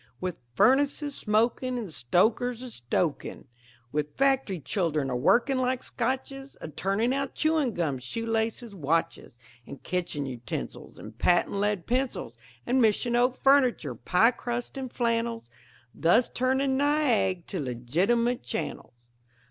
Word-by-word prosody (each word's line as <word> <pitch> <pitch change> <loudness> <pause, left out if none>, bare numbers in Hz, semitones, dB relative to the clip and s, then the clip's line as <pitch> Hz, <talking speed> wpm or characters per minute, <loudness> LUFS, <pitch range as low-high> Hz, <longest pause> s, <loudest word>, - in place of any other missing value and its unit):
With, 180 -2 -3 0.2
furnaces 285 - +3
smokin', 235 +3 0
And 210 -9 -5
stokers 220 - +1
a 250 - -8
stokin' 140 - -2 0.5
With 150 0 -3
factory 270 -9 +2
children 155 -6 -1
a - - -1
workin' 245 - +3
like 255 0 0
Scotches 265 +3 -4
A - - -7
turnin' 200 - 0
out 275 -1 -2
chewing 310 -7 +1
gum, 150 -7 -1
shoe 230 - -5
laces, 225 0 -2
watches, 165 -6 -1 0.3
And 140 - -10
kitchen 170 -5 -2
utensils, 125 -3 -6
And 110 +1 -10
patent 175 +9 +2
lead 205 -3 0
pencils, 250 - -1 0.3
And 255 +1 +2
mission 235 +2 +2
oak 250 +1 +1
furniture, 255 - +4
pie 180 - +3
crust, 240 +1 -5
and 260 -2 -5
flannels 230 - -1 0.5
Thus 220 +9 +3
turnin' 265 +1 +1
Niag' 265 - +2
to 190 - -3
legitimate 175 - 0
channels. 120 0 -5
230 Hz, 130 wpm, -27 LUFS, 165-255 Hz, 0.5 s, furniture